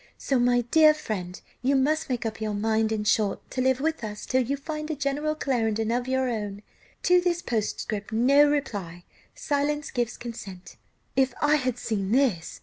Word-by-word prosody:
So, 270 -2 0
my 245 0 +3
dear 305 +6 +5
friend, 185 -11 -5 0.2
you 270 +2 +2
must 295 +4 +1
make 245 -2 -2
up 220 0 -4
your 215 -1 -2
mind 220 +1 +1
in 215 -1 -1
short 210 -1 0
to 255 - -1
live 260 0 +2
with 320 -1 -1
us 210 -1 -5
till 260 0 +2
you 270 +3 -1
find 305 +2 -5
a 310 - -1
General 290 +2 -1
Clarendon 225 -6 0
of 245 +1 -1
your 260 0 +1
own. 210 -3 -4 0.4
To 360 0 +5
this 350 -1 0
postscript 215 -2 -3
no 275 +6 +5
reply 200 - -3 0.3
silence 295 0 -1
gives 240 -2 -2
consent." 195 -6 -9 0.4
"If 265 -2 +2
I 295 +1 +4
had 255 -3 -1
seen 205 -4 -2
this!" 235 -11 +1
245 Hz, 180 wpm, -26 LUFS, 220-285 Hz, 0.4 s, dear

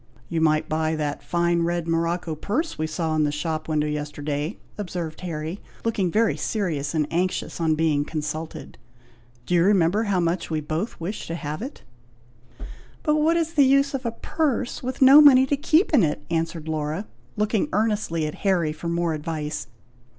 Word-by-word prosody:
"You 165 -2 -1
might 155 -1 +2
buy 155 0 0
that 150 -2 -3
fine 170 0 +1
red 170 0 -1
morocco 165 0 0
purse 220 - -2
we 155 - -2
saw 160 0 -2
in 155 - +2
the 145 - +1
shop 155 +1 -3
window 150 -1 +1
yesterday," 150 +2 -3 0.2
observed 175 -5 -5
Harry, 165 +1 -4 0.3
looking 205 -5 +1
very 220 +5 +2
serious 165 -8 -2
and 155 -1 +2
anxious, 180 0 -1
on 160 -1 +2
being 155 -2 +2
consulted. 155 +1 -5 0.7
"Do 180 - -2
you 170 -1 +5
remember 195 +2 +3
how 200 -3 +1
much 170 +1 -1
we 160 -1 0
both 155 +8 -3
wished 180 +6 -5
to 165 - -3
have 155 0 -5
it?" 270 +5 -7 1.2
"But 300 -1 +2
what 320 +2 +3
is 330 -1 -1
the 295 -4 +5
use 275 +1 +3
of 270 -1 -3
a 235 - -1
purse, 260 0 -2
with 255 +1 0
no 275 +3 +10
money 265 -3 +8
to 285 - +1
keep 315 +5 +2
in 275 - +6
it!" 150 -3 -1
answered 165 -1 -2
Laura, 155 +5 -2 0.3
looking 210 0 +1
earnestly 205 -6 0
at 150 - -3
Harry 180 -6 +2
for 160 +2 -7
more 170 -1 0
advice. 155 0 -4
170 Hz, 180 wpm, -24 LUFS, 155-215 Hz, 1.2 s, no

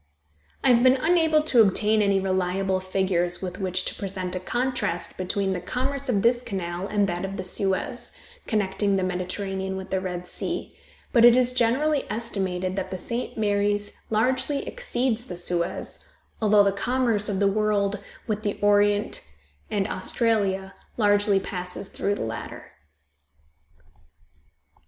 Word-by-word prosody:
I - - +4
have 235 - +4
been 255 +1 +6
unable 320 +1 +3
to 255 -6 +5
obtain 215 +1 +3
any 200 -1 +3
reliable 190 0 0
figures 185 -2 +1
with 180 0 -5
which 185 -1 0
to - - -1
present 185 -2 -4
a - - -1
contrast 240 -4 -2
between 190 +1 -1
the 180 - -3
commerce 260 +8 -3
of 205 -5 +1
this 240 +1 +4
canal 185 -4 -4
and 205 -1 +2
that 175 0 -3
of 195 +1 -4
the 185 - -3
Suez, 190 +1 -1 0.4
connecting 200 -2 0
the 190 - 0
Mediterranean 190 +1 -3
with 190 0 -8
the 190 - +1
Red 180 -1 -5
Sea, - - -2 0.4
but 235 - +5
it 240 0 +9
is 250 0 +3
generally 265 +5 +2
estimated 190 -5 -2
that 190 - -2
the 185 - -4
St. 235 +8 -4
Mary's 205 -1 0
largely 255 +6 0
exceeds 250 - -1
the 180 - -7
Suez, 175 -1 -2 0.4
although 210 -1 +5
the 200 - +3
commerce 230 0 0
of 200 - -1
the 200 - +3
world 205 0 +1 0.3
with 215 -2 -2
the 205 -2 -2
Orient 205 0 +2 0.5
and 200 -1 0
Australia 200 -6 0 0.2
largely 205 -2 +3
passes 180 +1 -5
through 200 +1 -1
the - - -6
latter. 110 -1 -7
200 Hz, 150 wpm, -25 LUFS, 190-230 Hz, 0.5 s, it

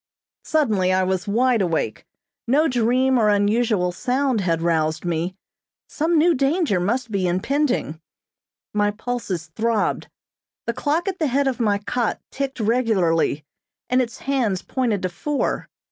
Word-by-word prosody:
Suddenly 215 -12 +1
I 185 0 +2
was 185 +1 -1
wide 235 +2 +2
awake. 165 - -2 0.4
No 295 +6 +3
dream 255 +1 +2
or 215 -2 +3
unusual 205 -2 +2
sound 255 +4 0
had 165 -3 0
roused 160 -1 0
me. 175 +2 -2 0.5
Some 325 +2 0
new 335 +3 +5
danger 280 - +1
must 230 +6 -1
be 190 -3 0
impending. 185 - 0 0.7
My 205 0 +2
pulses 205 -7 -4
throbbed. 225 -1 0 0.6
The 235 - -1
clock 300 - -1
at 380 -1 -2
the 315 - +1
head 275 +2 +1
of 260 -1 -1
my 210 -3 +2
cot 230 +3 -2
ticked 270 -1 -4
regularly, 200 - +1 0.5
and 255 +1 +4
its 235 -2 -4
hands 240 -9 0
pointed 230 -7 -1
to 185 - 0
four. 285 - -2
225 Hz, 145 wpm, -22 LUFS, 185-260 Hz, 0.7 s, new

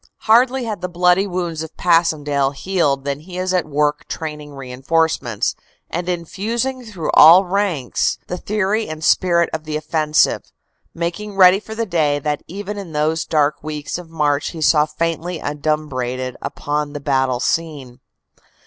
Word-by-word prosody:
Hardly 250 +4 +4
had 215 -5 -4
the 180 - -3
bloody 180 +2 +3
wounds 175 -4 -3
of 160 - -8
Passchendaele 150 -5 +2
healed 145 -6 0
than 140 0 -2
he 180 +4 -10
is 185 0 -1
at 180 -2 +1
work 150 0 0
training 150 -2 -6
reinforcements, 135 -2 -1 0.4
and 175 +2 -3
infusing 225 +9 -2
through 195 -8 -4
all 175 +5 +8
ranks 180 - 0
the 180 - -4
theory 210 +2 -1
and 155 0 -7
spirit 170 -1 +3
of 160 -1 -3
the 155 0 -2
offensive, 155 0 +1 0.4
making 175 +5 -4
ready 190 0 +7
for 220 +1 -9
the 230 0 -1
day 155 -6 +1
that 145 0 -2
even 205 +3 -6
in 180 -5 -8
those 155 +2 0
dark 150 -2 +1
weeks 150 +2 -4
of 175 -2 -11
March 150 -3 0
he 165 - -8
saw 150 +2 +4
faintly 165 +2 -2
adumbrated 135 -4 -2
upon 145 0 -3
the 145 - -5
battle 135 -3 0
scene. 140 -4 -2
160 Hz, 155 wpm, -19 LUFS, 145-180 Hz, 0.4 s, all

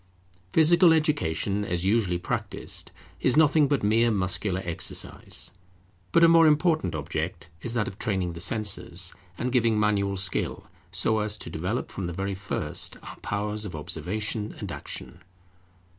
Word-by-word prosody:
Physical 165 - +6
education, 105 - 0
as 90 -2 -2
usually 100 -4 +2
practised, 90 - -3 0.3
is 130 +2 +2
nothing 155 -1 +5
but 140 -4 0
mere 115 +3 +4
muscular 95 -2 -1
exercise; 85 -1 -2 0.6
but 170 - +5
a - - +9
more 165 -1 +7
important 155 - +2
object 80 +2 -4
is 115 +4 -3
that 110 -3 +1
of 100 - -8
training 95 -5 -1
the 85 - -8
senses, 95 -3 +1 0.2
and 125 +1 -2
giving 115 -3 +3
manual 100 -2 +1
skill, 95 0 0 0.2
so 110 0 +1
as 105 0 0
to - - -7
develop 90 +10 -3
from 95 -3 -4
the 85 - -4
very 95 +3 -2
first 95 +1 -3
our - - -9
powers 105 +1 -3
of 95 -6 -5
observation 105 +7 -3
and - - -6
action. 85 - -6
105 Hz, 150 wpm, -26 LUFS, 90-120 Hz, 0.6 s, a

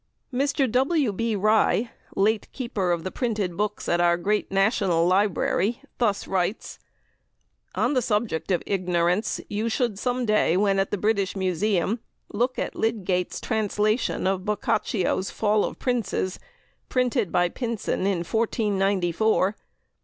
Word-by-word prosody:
Mr. 275 +1 +1
W. 265 -1 +2
B. 230 +2 -1
Rye, 215 +3 +2 0.2
late 210 +2 +1
Keeper 225 -8 -2
of 170 -1 -1
the 185 - -4
Printed 210 -8 -2
Books 210 +2 -2
at 175 0 +2
our 170 0 +4
great 210 +4 -1
National 195 -4 +2
Library, 200 +3 +1 0.2
thus 210 -5 +1
writes: 190 +2 -2 1.0
"On - - +1
the 255 - +2
subject 210 -7 -1
of 180 -3 +1
ignorance 180 0 0
you 215 +2 -2
should 225 -3 -1
some 250 +1 -1
day, 210 -5 +3
when 195 -1 +2
at 195 - +1
the 205 - -1
British 200 -1 0
Museum, 190 +3 0 0.3
look 245 +5 0
at - - -2
Lydgate's 190 -5 -1
translation 215 0 0
of 190 -1 0
Boccaccio's 205 -2 0
'Fall 210 -1 +1
of - - -3
Princes,' 225 -7 -1 0.5
printed 250 -6 +1
by 175 0 +3
Pynson 230 -2 -2
in 185 -4 0
1494. 200 -2 +1
205 Hz, 135 wpm, -25 LUFS, 185-225 Hz, 1.0 s, our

